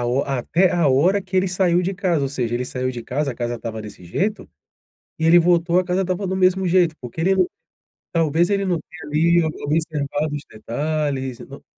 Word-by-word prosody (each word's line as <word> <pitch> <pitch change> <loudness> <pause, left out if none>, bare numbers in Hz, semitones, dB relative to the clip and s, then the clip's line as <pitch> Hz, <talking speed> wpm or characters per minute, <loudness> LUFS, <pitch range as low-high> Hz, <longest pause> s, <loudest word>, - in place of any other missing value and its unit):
a 120 - -1
ho 125 +3 +1
até 140 +7 +1
a 170 -4 +3
hora 175 +10 +3
que 185 0 -4
ele 185 +1 +3
saiu 180 -1 +2
de 190 +2 -2
casa, 175 -5 0
ou 135 - 0
seja, 120 -4 -2
ele 125 +1 -1
saiu 130 0 -2
de 120 -2 -6
casa, 135 +4 -2
a - - -13
casa 120 0 -3
estava 110 -2 -6
desse 105 -4 -11
jeito, 205 - -2 0.7
e 160 - 0
ele 170 +2 +7
voltou, 170 0 +3
a 185 - 0
casa 180 +1 0
estava 185 +2 -2
do 190 - -1
mesmo 185 0 +3
jeito. 175 -2 +3
Porque 125 +6 -8
ele 190 +3 +3
não 185 -2 +3 0.7
talvez 165 +2 +2
ele 200 0 +1
não 180 -3 +1
tenha, 175 -2 -12
ali, 170 +3 +3
o - - +1 0.2
observado 150 -1 -1
os 145 - -7
detalhes 135 +2 -3
e, - - -8
não - - -12
160 Hz, 225 wpm, -21 LUFS, 135-180 Hz, 0.7 s, ele